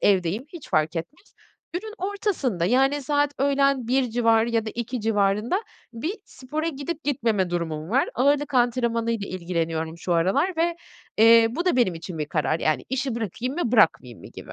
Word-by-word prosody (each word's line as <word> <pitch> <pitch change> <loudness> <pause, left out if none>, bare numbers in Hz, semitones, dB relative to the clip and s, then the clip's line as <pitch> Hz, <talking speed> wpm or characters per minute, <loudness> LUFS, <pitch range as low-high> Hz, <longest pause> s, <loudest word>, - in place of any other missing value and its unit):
evdeyim, 195 +3 +2
hiç 330 -2 -11
fark 155 +2 +1
etmez, 295 - -8 0.4
günün 425 +5 -5
ortasında, 370 - -1
yani, 270 +7 +2
saat 290 +1 +1
öğlen 275 -3 +2
1.00 255 -1 +1
civarı 230 -1 +2
da - - -2
2.00 240 +1 -3
civarında 210 - +1 0.3
bir 305 - -3
spora 305 +5 -4
gidip 300 +2 -5
gitmeme 225 -9 0
durumum 165 -1 -3
var. 265 +3 +2
Ağırlık 285 +2 +1
antrenmanıyla 230 -3 +1
ilgileniyorum 165 -2 -3
şu 175 +1 -2
aralar 195 - +1
ve, 335 +1 +1 0.4
eee, 230 0 +7
bu 330 +9 -3
da 360 - +2
benim 235 -8 +2
için 165 0 -7
bir 150 - -2
karar, 155 +1 -1
yani, 150 -5 0
“İşi 265 -1 -2
bırakayım 235 +4 -3
mı, 295 -9 -2
bırakmayayım 160 - +2
mı?” - - -11
gibi. - - -11
235 Hz, 165 wpm, -24 LUFS, 185-280 Hz, 0.4 s, eee